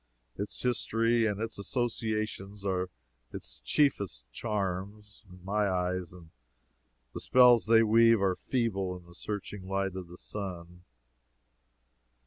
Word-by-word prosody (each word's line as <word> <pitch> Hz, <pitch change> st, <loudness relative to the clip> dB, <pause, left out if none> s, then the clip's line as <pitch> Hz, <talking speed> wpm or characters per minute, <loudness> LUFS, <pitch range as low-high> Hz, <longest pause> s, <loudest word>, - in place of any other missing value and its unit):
Its 100 Hz, +1 st, -5 dB
history 115 Hz, -1 st, +2 dB
and 105 Hz, -1 st, -2 dB
its 115 Hz, -1 st, -4 dB
associations 110 Hz, -3 st, -2 dB
are 90 Hz, -1 st, 0 dB, 0.4 s
its -, -, -7 dB
chiefest 135 Hz, -, +1 dB
charm, 100 Hz, -, -3 dB, 0.3 s
in 90 Hz, +1 st, -14 dB
any 105 Hz, +2 st, -1 dB
eyes, 90 Hz, -1 st, -1 dB
and 85 Hz, -3 st, -14 dB, 0.8 s
the -, -, -5 dB
spells 125 Hz, -3 st, +6 dB
they 115 Hz, 0 st, +6 dB
weave 115 Hz, +1 st, +5 dB
are 95 Hz, -2 st, +2 dB
feeble 100 Hz, -8 st, -1 dB
in 90 Hz, -, -15 dB
the 85 Hz, -, -16 dB
searching 100 Hz, 0 st, -6 dB
light 95 Hz, -1 st, -1 dB
of 95 Hz, -2 st, -6 dB
the 90 Hz, +1 st, -12 dB
sun. 90 Hz, -4 st, -7 dB
100 Hz, 125 wpm, -30 LUFS, 90-115 Hz, 0.8 s, spells